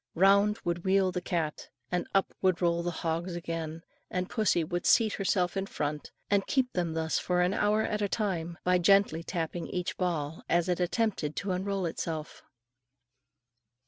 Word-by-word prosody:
Round 200 Hz, +4 st, +5 dB
would 170 Hz, 0 st, -1 dB
wheel 190 Hz, -1 st, +3 dB
the 180 Hz, -, -3 dB
cat, 160 Hz, -4 st, -2 dB, 0.2 s
and 180 Hz, 0 st, -1 dB
up 195 Hz, -, +2 dB
would 185 Hz, -2 st, +2 dB
roll 170 Hz, -1 st, +2 dB
the 175 Hz, -, -1 dB, 0.2 s
hogs 170 Hz, +2 st, -1 dB
again, 165 Hz, -1 st, -4 dB, 0.3 s
then 180 Hz, 0 st, -1 dB
pussy 205 Hz, -4 st, +1 dB
would 175 Hz, +2 st, -2 dB
seat 220 Hz, -3 st, +5 dB
herself 190 Hz, -2 st, 0 dB
in 195 Hz, 0 st, -2 dB
front, 150 Hz, -3 st, -3 dB, 0.2 s
and 200 Hz, -1 st, +1 dB
keep 260 Hz, -2 st, +1 dB
them 175 Hz, -3 st, -1 dB
thus 160 Hz, 0 st, 0 dB
for 180 Hz, 0 st, +1 dB
an 180 Hz, +2 st, +2 dB
hour 210 Hz, +2 st, +2 dB
at 210 Hz, 0 st, -1 dB
a 205 Hz, -, 0 dB
time, 175 Hz, -6 st, -2 dB
by 180 Hz, 0 st, +3 dB
gently 195 Hz, -2 st, +4 dB
tapping 170 Hz, 0 st, -3 dB
each 180 Hz, -1 st, -3 dB
ball 160 Hz, -4 st, -2 dB
as 170 Hz, +1 st, +2 dB
it 180 Hz, -1 st, 0 dB
attempted 180 Hz, -4 st, 0 dB
to 200 Hz, -, -2 dB
unroll 190 Hz, +1 st, -1 dB
itself. 160 Hz, -1 st, -4 dB
180 Hz, 175 wpm, -29 LUFS, 165-195 Hz, 0.3 s, Round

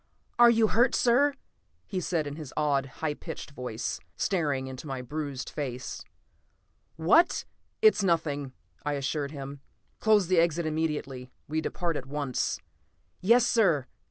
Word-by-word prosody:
"You're 225 Hz, -2 st, +4 dB
hurt, 240 Hz, +3 st, +3 dB
sir!" 275 Hz, +4 st, +4 dB, 0.5 s
he 190 Hz, -, -3 dB
said 165 Hz, -3 st, 0 dB
in 145 Hz, 0 st, -5 dB
his 150 Hz, -4 st, -8 dB
odd, 140 Hz, -3 st, +1 dB, 0.2 s
high 150 Hz, -, +1 dB
pitched 145 Hz, -, -8 dB
voice, 125 Hz, -4 st, -4 dB, 0.2 s
staring 145 Hz, -8 st, 0 dB
into 130 Hz, +3 st, -7 dB
my 130 Hz, -2 st, -4 dB
bruised 145 Hz, 0 st, -4 dB
face. 130 Hz, -4 st, -5 dB, 0.9 s
"What 195 Hz, -, +4 dB, 0.2 s
" -, -, -46 dB
"It's 435 Hz, -, +6 dB
nothing," 160 Hz, -7 st, 0 dB, 0.3 s
I 145 Hz, -, -1 dB
assured 140 Hz, +1 st, -2 dB
him. 140 Hz, -1 st, -7 dB, 0.4 s
"Close 215 Hz, -3 st, +4 dB
the 180 Hz, 0 st, +3 dB
exit 170 Hz, 0 st, +2 dB
immediately; 150 Hz, -5 st, -2 dB, 0.2 s
we 155 Hz, +1 st, -1 dB
depart 170 Hz, -1 st, -2 dB
at 130 Hz, -, -7 dB
once." 140 Hz, -2 st, -1 dB, 0.6 s
"Yes, 235 Hz, +5 st, +5 dB
sir!" 175 Hz, -, +3 dB
150 Hz, 140 wpm, -28 LUFS, 140-185 Hz, 0.9 s, It's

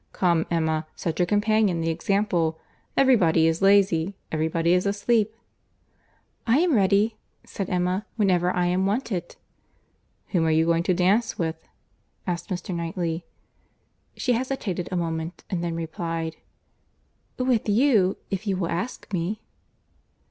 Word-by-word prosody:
—Come 170 Hz, -3 st, +2 dB
Emma, 160 Hz, -2 st, 0 dB
set 165 Hz, 0 st, -3 dB
your 175 Hz, -, +3 dB
companions 205 Hz, -4 st, +2 dB
the 165 Hz, -, +1 dB
example. 170 Hz, -2 st, 0 dB, 0.4 s
Every 265 Hz, -1 st, +6 dB
body 165 Hz, -5 st, +3 dB
is 165 Hz, +2 st, +1 dB
lazy! 195 Hz, -2 st, +3 dB, 0.2 s
Every 155 Hz, 0 st, 0 dB
body 165 Hz, +1 st, +1 dB
is 180 Hz, +2 st, +2 dB
asleep!" 215 Hz, +2 st, +1 dB, 1.1 s
"I 230 Hz, +3 st, +4 dB
am 340 Hz, 0 st, +3 dB
ready," 205 Hz, +1 st, +3 dB, 0.3 s
said 195 Hz, -2 st, -5 dB
Emma, 180 Hz, +2 st, 0 dB
"whenever 185 Hz, -5 st, +2 dB
I 180 Hz, -1 st, +1 dB
am 185 Hz, +2 st, +1 dB
wanted." 200 Hz, -5 st, -2 dB, 0.9 s
"Whom 175 Hz, -5 st, +1 dB
are -, -, +2 dB
you 160 Hz, +1 st, +3 dB
going 165 Hz, 0 st, +2 dB
to 180 Hz, -, +4 dB
dance 200 Hz, +6 st, +2 dB
with?" 160 Hz, -1 st, -3 dB, 0.6 s
asked 175 Hz, -2 st, -3 dB
Mr. 185 Hz, 0 st, -4 dB
Knightley. 170 Hz, -1 st, -3 dB, 0.9 s
She 250 Hz, -, +1 dB
hesitated 230 Hz, -8 st, -2 dB
a -, -, -1 dB
moment, 165 Hz, 0 st, -3 dB
and 175 Hz, -2 st, -1 dB
then 170 Hz, -1 st, -2 dB
replied, 165 Hz, 0 st, -4 dB, 1.0 s
"With 255 Hz, -4 st, +1 dB
you, 210 Hz, -4 st, +3 dB
if 195 Hz, +2 st, -3 dB
you 195 Hz, -2 st, +1 dB
will 170 Hz, -3 st, -2 dB
ask 200 Hz, +4 st, -4 dB
me." 185 Hz, +4 st, -2 dB
180 Hz, 140 wpm, -25 LUFS, 165-205 Hz, 1.1 s, Every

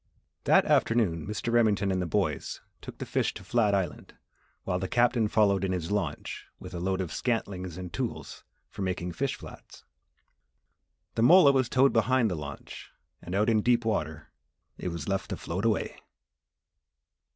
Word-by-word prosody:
That -, -, +5 dB
afternoon, 95 Hz, -9 st, +2 dB
Mr. 105 Hz, +2 st, -3 dB
Remington 105 Hz, -4 st, +3 dB
and 95 Hz, -1 st, 0 dB
the 90 Hz, -, -2 dB
boys 80 Hz, -, -1 dB, 0.2 s
took -, -, -9 dB
the -, -, -5 dB
fish -, -, -1 dB
to -, -, -9 dB
Flat 105 Hz, -4 st, +2 dB
Island 95 Hz, -3 st, -3 dB, 0.5 s
while 90 Hz, -, -1 dB
the 95 Hz, -, -2 dB
Captain 120 Hz, 0 st, +2 dB
followed 100 Hz, -3 st, +3 dB
in 95 Hz, -1 st, 0 dB
his 85 Hz, -1 st, -3 dB
launch 90 Hz, -8 st, -3 dB
with -, -, -10 dB
a 85 Hz, -, -4 dB
load 95 Hz, +1 st, -1 dB
of 90 Hz, -, -4 dB
scantlings 95 Hz, -8 st, -2 dB
and 90 Hz, -2 st, -7 dB
tools -, -, -5 dB, 0.2 s
for -, -, -9 dB
making 90 Hz, -2 st, -2 dB
fish 135 Hz, +10 st, -2 dB
flats. -, -, -13 dB, 1.3 s
The 115 Hz, -, -1 dB
mola 155 Hz, +3 st, +8 dB
was 130 Hz, -3 st, +1 dB
towed 135 Hz, +2 st, +4 dB
behind 115 Hz, 0 st, +3 dB
the -, -, -1 dB
launch 70 Hz, -2 st, -8 dB, 0.3 s
and 90 Hz, -, -5 dB
out 105 Hz, +2 st, +2 dB
in 110 Hz, -2 st, +3 dB
deep 120 Hz, 0 st, +2 dB
water 80 Hz, -9 st, -2 dB, 0.4 s
it -, -, -6 dB
was 85 Hz, -4 st, -4 dB
left 95 Hz, -1 st, -2 dB
to -, -, -3 dB
float 95 Hz, +6 st, -4 dB
away. 110 Hz, -3 st, 0 dB
100 Hz, 170 wpm, -28 LUFS, 90-115 Hz, 1.3 s, mola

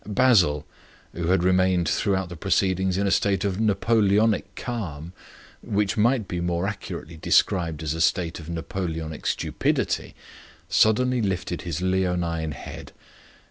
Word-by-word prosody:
Basil, 100 Hz, -, +3 dB, 0.5 s
who 85 Hz, -1 st, -3 dB
had 90 Hz, 0 st, +2 dB
remained 95 Hz, -1 st, +3 dB
throughout 95 Hz, +4 st, 0 dB
the 85 Hz, -, -7 dB
proceedings 95 Hz, +1 st, +1 dB
in 100 Hz, -, +1 dB
a 100 Hz, -, +1 dB
state 100 Hz, 0 st, +1 dB
of 100 Hz, 0 st, -1 dB
Napoleonic 105 Hz, 0 st, +2 dB
calm, 90 Hz, -9 st, -5 dB, 0.5 s
which 105 Hz, -1 st, 0 dB
might 115 Hz, -1 st, +2 dB
be 90 Hz, -1 st, -3 dB
more 85 Hz, +1 st, -1 dB
accurately 90 Hz, -5 st, -6 dB
described 80 Hz, -1 st, +1 dB
as 75 Hz, -1 st, -1 dB
a 80 Hz, -, -3 dB
state 85 Hz, 0 st, +1 dB
of 80 Hz, 0 st, -10 dB
Napoleonic 80 Hz, -2 st, -4 dB
stupidity, -, -, -1 dB, 0.5 s
suddenly 125 Hz, +3 st, +3 dB
lifted 90 Hz, -4 st, -2 dB
his 85 Hz, 0 st, -4 dB
leonine 90 Hz, -4 st, 0 dB
head. 65 Hz, -, -9 dB
95 Hz, 135 wpm, -24 LUFS, 85-100 Hz, 0.5 s, Basil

